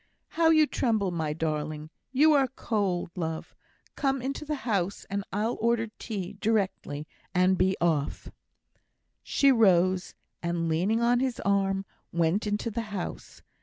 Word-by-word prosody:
"How 330 -1 +3
you 310 -1 +6
tremble, 220 -9 0
my 160 -3 -2
darling! 155 0 -3 0.2
You 300 +4 +5
are 275 -2 +4
cold, 200 -9 -2
love! 160 -3 -4 0.4
Come 270 -1 0
into 275 +4 -4
the 300 0 -2
house, 200 -4 -1
and 200 0 -1
I'll 215 +4 -1
order 230 -1 +1
tea 200 -4 -4
directly 190 -9 -1 0.3
and 185 +1 +4
be 185 +1 +2
off." 160 -4 0 0.9
She 275 -1 +3
rose, 185 -5 +3 0.3
and, 170 -1 -1
leaning 185 +8 +1
on 240 +1 +3
his 260 -2 -1
arm, 195 -1 +1 0.3
went 170 +5 +1
into 210 +3 -1
the 230 +2 -2
house. 195 -4 -6
200 Hz, 140 wpm, -28 LUFS, 170-235 Hz, 0.9 s, you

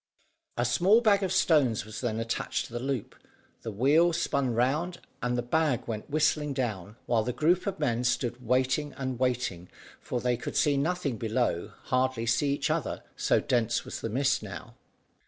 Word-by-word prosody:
A 120 - +1
small 175 - +4
bag 205 -3 +4
of 190 -2 -1
stones 150 - +3
was 110 0 -7
then 115 -3 -1
attached 115 0 -2
to - - -13
the 120 - -2
loop, 130 -2 -3 0.5
the 115 - -5
wheel 150 - +4
spun 135 -6 0
round, 150 +9 0 0.2
and 125 0 0
the 120 - -1
bag 145 -1 0
went 110 +1 -5
whizzing 150 -1 +1
down, 105 -6 -3
while 115 -2 +2
the 125 - -2
group 170 - +1
of 195 - -2
men 125 -5 0
stood 125 0 -1
waiting 130 +4 +1
and 130 -3 -3
waiting, 125 -9 -1 0.3
for 125 - -3
they 125 0 0
could 125 - -6
see 145 -1 +3
nothing 145 -3 -1
below, 110 -5 -1
hardly 130 -2 0
see 120 +5 +2
each 145 +2 0
other, 155 -5 -2
so - - +2
dense 120 -1 0
was - - -6
the 115 - -3
mist 135 +4 +1
now. 95 -6 -8
125 Hz, 180 wpm, -28 LUFS, 115-150 Hz, 0.5 s, small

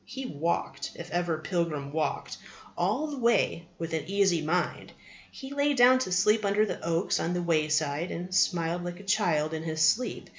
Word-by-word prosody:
He 265 0 -7
walked, 165 - -3
if 170 -1 -9
ever 175 -1 0
pilgrim 155 -4 -2
walked, 160 -1 -2 0.4
all 210 - 0
the 290 -3 -5
way 230 -8 +1
with 165 -1 -5
an 160 - -2
easy 195 -4 +2
mind. 175 +3 -1 0.4
He 270 0 -9
lay 285 0 +1
down 255 +1 +6
to 255 - -3
sleep 210 +4 +3
under 205 +1 +2
the - - -5
oaks 170 +2 0
on 170 - -1
the 175 - -1
wayside, 155 -1 0
and 180 +2 -6
smiled 175 -2 +1
like 175 0 -6
a - - -11
child 170 -7 +1
in 160 - -3
his 160 -1 -4
sleep. 250 +2 0
175 Hz, 185 wpm, -28 LUFS, 160-210 Hz, 0.4 s, down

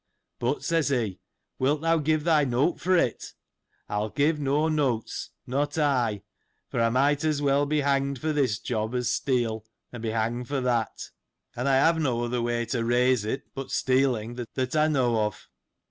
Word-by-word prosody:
But, 125 +4 -1
says 165 -3 +1
he, 115 -8 -1 0.4
wilt 145 +3 +1
thou 165 0 +3
give 155 0 +1
thy 155 -2 +4
note 135 +6 +1
for 185 0 +2
it? 125 -9 -1 0.5
I'll 105 +1 -2
give 150 +5 +1
no 145 +2 +1
notes, 140 -8 -1 0.2
not 145 +4 -1
I: 125 - +1 0.5
for 115 - 0
I 115 - +3
might 140 +5 +2
as 155 -2 +1
well 145 0 +2
be 150 0 +1
hanged 140 -1 +1
for 155 +4 -2
this 130 -8 +1
job, 110 +1 -3
as 125 -1 0
steal, 120 -5 0 0.3
and 120 - -8
be 115 - -2
hanged 115 +2 -1
for 140 +1 -1
that; 120 -3 -1 0.4
and 125 +3 -1
I 135 - +4
have 160 +5 +4
no 120 -5 0
other 120 0 -1
way 120 0 -1
to 115 -1 -2
raise 120 -1 +2
it, 120 +5 -3
but 135 -1 -6
stealing, 125 -3 +1 0.2
that 130 +2 -1
I 155 0 +4
know 125 -7 +2
of. 105 -1 -5
130 Hz, 180 wpm, -26 LUFS, 120-145 Hz, 0.5 s, thy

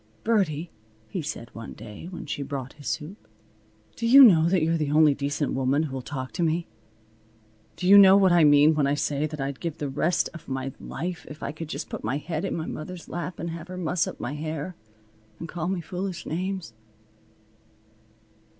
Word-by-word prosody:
"Birdie," 175 -8 0 0.4
he 185 - -3
said 120 -6 -6
one 115 - -8
day, 105 +8 -10
when 180 -1 -8
she 145 - -4
brought 135 -2 -5
his 150 -2 -11
soup, 170 +8 -5 0.7
"do 230 - -2
you 270 +4 +10
know 170 -8 +7
that 180 -3 +2
you're 165 +1 +2
the 150 -3 -1
only 150 0 +5
decent 145 +1 -2
woman 135 +3 +1
who'll 135 -4 -4
talk 130 +1 -6
to - - -4
me? 165 +1 +1 1.1
Do 180 - -3
you 200 +1 +9
know 195 0 +8
what 190 -2 +5
I 175 -2 +5
mean 145 +1 +6
when 150 -2 +1
I 140 - +2
say 145 +1 -1
that 155 -1 -8
I'd 135 0 -3
give 165 -3 -4
the 145 - -3
rest 155 +5 +1
of 170 - -11
my 135 0 -3
life 175 0 -5
if 150 - -10
I - - -2
could 155 +1 -8
just - - -5
put - - -7
my 125 +6 -1
head 155 +2 -3
in - - -2
my 160 - -3
mother's 170 +3 -7
lap 175 0 -5
and 170 +1 -4
have 165 +1 -7
her 185 0 -7
muss 170 -1 0
up - - -7
my 130 - -4
hair 155 +3 -4 0.6
and 165 - -7
call 165 0 -4
me 185 -1 -1
foolish 180 0 -5
names?" 185 -3 -3
160 Hz, 205 wpm, -26 LUFS, 145-175 Hz, 1.1 s, you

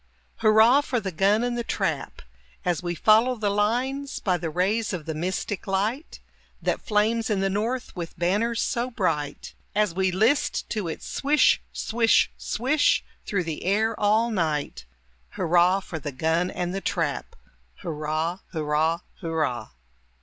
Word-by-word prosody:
Hurrah 220 +6 +5
for 255 -4 -1
the 195 -3 -4
gun 200 +6 +2
and 245 0 -1
the 240 - -2
trap, - - -3 0.4
As 175 -3 0
we 175 -1 -3
follow 225 +8 +4
the 210 -3 -1
lines 250 +7 -1
By 185 -3 +1
the 165 -1 -3
rays 200 +7 0
of 170 -5 -4
the 160 - -3
mystic 185 +5 -3
light 210 - -2 0.4
That - - -1
flames 220 +2 +1
in 205 -3 +1
the 195 0 +1
north 230 +6 -2
with 170 -1 -6
banners 210 +7 +1
so 240 +1 -1
bright, 165 - -2 0.2
As 210 -4 +2
we 190 +1 +1
list 220 +10 +1
to 210 -6 -2
its 160 - -6
swish, 295 +2 +3
swish, 225 0 +2
swish, 290 +5 +1 0.2
through 200 -4 0
the 160 -2 -5
air 215 +4 +2
all 215 +3 +3
night, 155 - -2 0.5
Hurrah 180 +3 +3
for 165 -3 -6
the 145 0 -5
gun 160 +6 0
and 180 0 -3
the 195 - -3
trap! - - -2 0.5
Hurrah! 155 +3 -2
Hurrah! 160 +2 0 0.2
Hurrah! 155 - -2
195 Hz, 150 wpm, -25 LUFS, 170-225 Hz, 0.5 s, Hurrah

